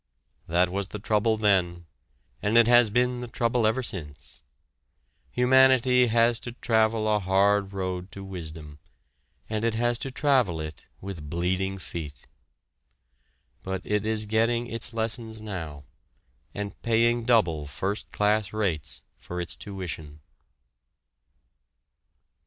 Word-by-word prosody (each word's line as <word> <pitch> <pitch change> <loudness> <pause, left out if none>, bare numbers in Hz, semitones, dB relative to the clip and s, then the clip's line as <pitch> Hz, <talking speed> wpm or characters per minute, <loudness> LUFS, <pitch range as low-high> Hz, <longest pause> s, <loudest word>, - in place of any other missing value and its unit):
That 90 +2 +2
was 100 0 -2
the 105 - -6
trouble 110 +1 +1
then, 90 -5 +1 0.6
and 105 +3 +2
it 115 - +7
has 120 -1 +6
been 125 +3 +1
the 125 - -6
trouble 115 -1 +1
ever 125 +4 0
since. 75 -10 -6 0.9
Humanity 125 - +4
has 115 0 +3
to 120 - -8
travel 110 -2 +1
a 105 -1 +2
hard 100 +1 +2
road 95 -1 -4
to 100 - -8
wisdom, 80 -5 -8 0.7
and 110 0 -3
it 115 -1 +1
has 120 +1 +1
to 135 - -3
travel 130 - +1
it 80 -1 -8
with 85 -6 -7
bleeding 95 +3 -1
feet. 75 -7 -8 1.4
But 95 -1 -4
it 105 -1 0
is 110 0 0
getting 115 +3 +1
its 115 0 +1
lessons 110 0 -1
now 80 -9 -6 0.7
and 100 0 -6
paying 115 +1 +2
double 85 -11 +2
first 95 +9 -4
class 105 -1 +1
rates 95 -9 -3 0.2
for 90 - -6
its 85 - -4
tuition! 80 -6 -7
105 Hz, 125 wpm, -26 LUFS, 90-115 Hz, 1.4 s, it